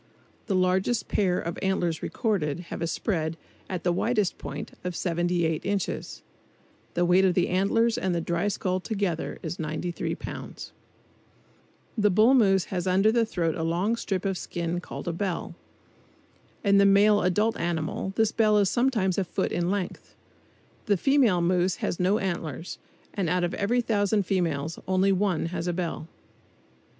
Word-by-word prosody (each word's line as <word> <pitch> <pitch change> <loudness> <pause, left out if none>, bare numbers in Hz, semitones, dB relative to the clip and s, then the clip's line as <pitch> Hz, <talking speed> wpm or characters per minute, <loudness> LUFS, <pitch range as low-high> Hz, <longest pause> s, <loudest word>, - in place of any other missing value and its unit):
The 200 - 0
largest 185 +5 +1
pair 180 -3 +1
of 170 0 -4
antlers 175 -4 0
recorded 175 - -1
have - - -5
a 165 - 0
spread, 165 -2 -2 0.3
at 180 -3 -4
the 175 - +2
widest 210 0 0
point, - - -6
of 180 -1 -3
78 170 -2 0
inches. 200 -2 -3 0.7
The 175 - +2
weight 180 +2 +4
of 185 -2 +3
the 180 - +2
antlers 225 +5 +2
and 185 -2 0
the - - +1
dry 170 +3 -1
skull 185 -2 -1
together 195 -5 -2
is 175 - -5
93 160 +2 -3
pounds. - - -8 1.2
The 210 -2 +3
bull 215 +7 +5
moose 195 -7 +4
has 180 -1 -2
under 195 +4 +4
the 230 -1 +2
throat 165 -6 -1
a 160 - -4
long 175 +7 0
strip 195 -5 -3
of 195 -2 -1
skin 170 0 -3
called - - -8
a 170 - -1
"bell." 180 0 -3 1.1
In 200 -2 +4
the 200 +1 +5
adult 210 +5 +2
male - - -5
animal 170 +2 -2
this 220 -1 +2
bell 215 -2 +3
is 200 -2 +3
sometimes 225 -7 +1
a - - +2
foot 180 - -2
in 175 0 0
length 195 -2 -4 0.7
The 205 -2 +3
female 250 -6 +3
moose 180 +1 +2
has - - -3
no 185 +3 +3
antlers, 170 - -4 0.3
and 190 -5 -1
out 180 0 +1
of 175 - -1
every 235 +5 +1
thousand 205 -3 +1
females 165 -5 -1
only 190 +1 +3
one 190 -4 +1
has 170 0 -3
a 175 - 0
bell. 170 -2 -3
185 Hz, 165 wpm, -26 LUFS, 175-205 Hz, 1.2 s, bull